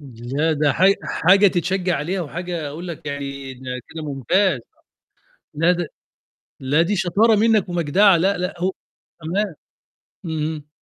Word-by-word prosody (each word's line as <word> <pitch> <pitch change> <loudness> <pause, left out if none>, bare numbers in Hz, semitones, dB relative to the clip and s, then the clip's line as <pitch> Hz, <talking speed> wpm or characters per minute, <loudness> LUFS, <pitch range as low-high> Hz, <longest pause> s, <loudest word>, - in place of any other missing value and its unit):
لأ 135 +4 -2
ده 150 -2 +2
حاج 190 +6 +4
حاجة 195 +4 +4
تتشجّع 185 0 0
عليها 175 +7 -2
وحاجة 170 0 -4
أقول 165 +5 -7
لك 165 -2 -8
يعني 140 -2 -5
ده 125 0 -6
كده 160 -1 -7
ممتاز، 150 - +1 0.9
لا 165 +4 +3
ده 175 -2 -1 0.7
لا 140 +4 +2
دي 185 +5 +1
شطارة 200 +5 +3
منك 215 -2 +3
ومجدعة 175 +3 +4
لأ، 195 +4 +1
لأ 180 0 -2
هو 185 +1 +1 0.5
تمام، 185 +3 -2 0.7
اهم. 155 -2 -4
165 Hz, 140 wpm, -21 LUFS, 145-185 Hz, 0.9 s, حاج